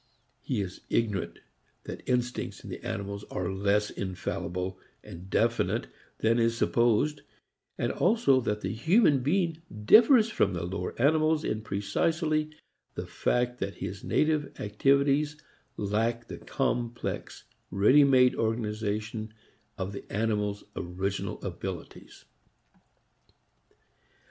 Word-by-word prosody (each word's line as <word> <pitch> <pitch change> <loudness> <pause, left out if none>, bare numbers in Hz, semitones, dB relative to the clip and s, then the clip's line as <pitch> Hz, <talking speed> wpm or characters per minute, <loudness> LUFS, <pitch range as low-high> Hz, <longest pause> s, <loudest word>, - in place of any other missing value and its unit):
He - - -1
is 95 -2 -6
ignorant 105 -5 -1 0.5
that - - -7
instincts 125 -1 -1
in - - -8
the - - -7
animals 100 0 -4
are 90 0 -2
less 100 +2 +1
infallible 90 -1 -4 0.2
and 90 +3 -10
definite 115 +3 +1 0.4
than 115 +2 +3
is 115 0 +2
supposed, 120 +6 +2 0.6
and - - 0
also 180 - +3
that 105 -2 -2
the - - -2
human 155 - +4
being 165 +4 0 0.2
differs 225 - +7
from 100 - +1
the 85 -2 -3
lower 90 +3 -4
animals 155 +3 +3
in 110 - -2
precisely 155 - 0 0.5
the - - -4
fact 125 0 0
that 100 0 -3
his 95 - -6
native 155 -1 0
activities 140 +7 +2 0.4
lack 115 +3 -1
the - - -8
complex 120 0 -3 0.3
ready 105 +10 +5
made 130 -2 +5
organization 110 -1 -2 0.5
of 95 +2 -4
the 100 - -7
animals' 105 -1 -1
original 95 +3 -3
abilities. - - -7
115 Hz, 115 wpm, -28 LUFS, 100-140 Hz, 0.6 s, differs